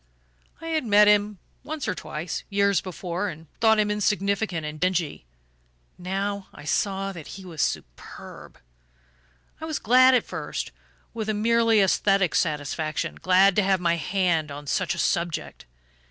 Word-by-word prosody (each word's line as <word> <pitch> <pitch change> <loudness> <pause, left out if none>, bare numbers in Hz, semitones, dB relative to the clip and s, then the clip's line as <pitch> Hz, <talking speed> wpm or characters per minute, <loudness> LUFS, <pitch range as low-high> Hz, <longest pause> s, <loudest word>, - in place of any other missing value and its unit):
I 330 +1 -7
had 315 -2 0
met 210 -2 +5
him 210 0 +3 0.3
once 300 +1 -5
or - - 0
twice, 155 +2 -5
years 200 -1 +2
before, 185 +1 -4
and 160 -1 -10
thought 220 -1 +4
him 210 -1 +2
insignificant 200 -4 0
and 150 0 -6
dingy. 170 - -1 0.7
Now 195 +2 -3
I - - -11
saw 195 +5 -1
that 165 -5 -10
he 190 - -11
was 165 -4 -5
superb. - - -6 1.0
"I 320 - -6
was 315 -2 -2
glad 255 +3 +5
at 245 - +2
first, - - -5 0.4
with 220 -2 -4
a 215 - 0
merely 230 0 +3
aesthetic 195 -1 +2
satisfaction: 155 0 -2
glad 185 +1 +5
to - - +6
have 190 -1 +2
my 170 -1 +1
hand 170 -3 0
on 145 +1 -8
such 145 - -1
a - - -9
'subject. 170 - -2
195 Hz, 155 wpm, -25 LUFS, 170-210 Hz, 1.0 s, to